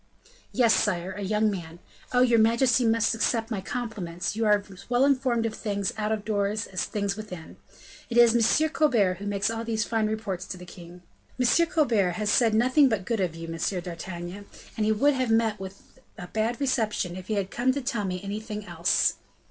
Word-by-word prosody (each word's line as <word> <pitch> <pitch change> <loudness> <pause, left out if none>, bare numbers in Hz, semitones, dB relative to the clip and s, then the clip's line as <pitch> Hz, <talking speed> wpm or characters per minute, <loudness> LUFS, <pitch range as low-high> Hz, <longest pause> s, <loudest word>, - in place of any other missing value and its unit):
"Yes, 235 -3 +4
sire; 185 -3 0
a 205 +2 -7
young 210 +2 +1
man. 170 -4 -7 0.3
Oh! 250 - +3
your 240 -2 +4
majesty 235 +2 +3
must 225 0 +2
accept 225 0 0
my 205 -4 -2
compliments, 190 -5 -4
you 225 0 0
are 210 -1 +3
as 185 - -15
well 245 +2 +3
informed 255 -4 +1
of 225 - -2
things 200 -3 -2
out 210 0 -2
of 215 -2 -2
doors 210 0 -1
as 185 - -3
things 200 -1 -2
within. 185 -6 -9 0.5
It 235 - -2
is 235 -1 +6 0.3
M. 315 - +1
Colbert 230 -13 +2
who 205 - -6
makes 205 +2 0
all 225 0 -4
these 225 -1 -1
fine 220 -1 0
reports 205 -4 -4
to 185 - -6
the 180 - -11
king." 175 0 -13 0.4
"M. 255 +7 +3
Colbert 235 - +2
has 210 +2 -1
said 225 -2 +3
nothing 255 +5 +4
but 205 -5 -1
good 230 -2 -1
of 180 -4 -1
you, 165 0 -7
M. 165 +3 -2
d'Artagnan, 175 +2 -7 0.3
and 215 -1 0
he - - +3
would 280 +7 +3
have 255 -2 -1
met 225 -2 +2
with 195 +6 -11 0.2
a 180 - -7
bad 220 +6 -2
reception 220 -9 -1
if 185 0 -9
he 215 - -1
had 195 -1 -2
come 250 +2 +1
to 280 +2 -3
tell 235 -4 -2
me 180 -1 -3
anything 210 +1 -5
else." 175 - +1
215 Hz, 205 wpm, -26 LUFS, 190-235 Hz, 0.5 s, is